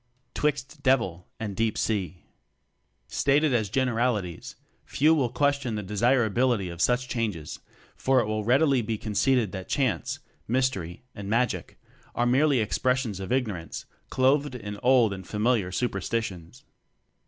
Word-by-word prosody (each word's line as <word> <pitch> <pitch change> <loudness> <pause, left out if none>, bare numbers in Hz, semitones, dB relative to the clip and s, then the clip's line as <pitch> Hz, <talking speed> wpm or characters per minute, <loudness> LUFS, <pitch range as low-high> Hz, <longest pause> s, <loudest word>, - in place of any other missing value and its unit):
Twixt 150 -1 -2
Devil 115 -11 +1
and 105 -3 -4
Deep 110 0 0
Sea. 95 -6 -2 0.8
Stated 145 - +2
as 110 -4 +1
generalities, 115 -7 -1 0.3
few 155 +3 +3
will 135 -6 +1
question 140 -2 0
the 105 - -3
desirability 115 0 +2
of 85 0 -6
such 125 +1 +2
changes; 105 -11 -3 0.4
for 130 0 +2
it 120 - +1
will 110 0 -2
readily 135 +3 +3
be 110 0 -2
con 105 0 -6
ceded 115 0 +2
that 95 -2 -7
"chance," 135 -3 0 0.3
"mystery," 115 -9 -1
and 100 -1 -7
"magic" 120 +3 -1 0.4
are 120 - +1
merely 135 +1 +3
expressions 125 -1 0
of 95 +2 -6
ignorance 110 -10 -2 0.2
clothed 135 +1 +2
in 105 -3 -6
old 125 -4 +4
and 95 -1 -8
familiar 105 -3 +1
superstitions. 100 -6 -3
115 Hz, 135 wpm, -26 LUFS, 100-130 Hz, 0.8 s, old